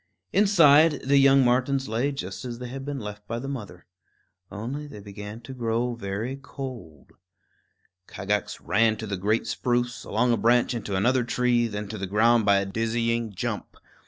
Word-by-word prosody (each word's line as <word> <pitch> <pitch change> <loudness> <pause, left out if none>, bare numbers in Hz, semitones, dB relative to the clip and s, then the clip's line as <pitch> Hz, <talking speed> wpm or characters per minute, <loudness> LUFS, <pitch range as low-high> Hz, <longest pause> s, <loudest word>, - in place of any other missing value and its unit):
Inside, 165 -7 +5
the 140 +1 +4
young 135 -1 +6
martens 130 +2 +1
lay 120 +6 0
just 95 -8 -6
as 120 -2 -5
they 125 0 -7
had 135 +2 -6
been 145 0 -4
left 105 -1 -8
by 115 - -3
the 130 +3 -5
mother; 105 -10 -7 0.7
only 130 +8 -5
they 120 -8 -10
began 105 +2 -9
to 130 +3 -9
grow 120 0 -1
very 110 +4 -4
cold. 130 - -9 1.0
Kagax 105 0 -2
ran 110 0 +2
to 110 - -6
the 100 -2 -3
great 105 +5 0
spruce, 120 +1 -1
along 120 +3 +1
a - - +1
branch 120 +2 +3
into 105 -4 -3
another 125 +6 +2
tree; 120 0 +1
then 105 -1 -5
to 110 0 -6
the 95 - -3
ground 110 +3 +3
by 100 -1 +6
a 100 - 0
dizzy 115 +2 -1
jump. 100 - -5
115 Hz, 175 wpm, -26 LUFS, 105-130 Hz, 1.0 s, young